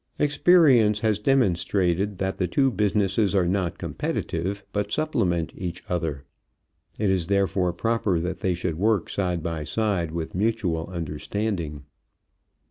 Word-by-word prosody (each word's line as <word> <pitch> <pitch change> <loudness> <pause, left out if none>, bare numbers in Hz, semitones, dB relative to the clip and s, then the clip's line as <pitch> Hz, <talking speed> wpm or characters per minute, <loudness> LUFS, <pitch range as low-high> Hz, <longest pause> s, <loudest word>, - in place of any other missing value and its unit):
Experience 140 - +4
has 110 -2 +1
demonstrated 100 -5 +1
that 95 0 -2
the 90 - +1
two 135 - +2
businesses 100 -1 +1
are 90 -3 +3
not 95 -1 -1
competitive, 95 +5 -3
but 105 0 -2
supplement 90 - 0
each 90 -1 -5
other. 80 -6 -2 0.7
It 105 -2 +1
is 90 -3 +1
therefore 95 -2 +1
proper 105 -1 0
that 90 +2 -3
they 95 -2 0
should 85 -2 -3
work 105 -3 +1
side 90 -4 -1
by 85 -3 -3
side 100 -2 -1
with 80 0 -5
mutual 95 -5 0
understanding. 85 -1 -3
95 Hz, 130 wpm, -25 LUFS, 85-105 Hz, 0.7 s, Experience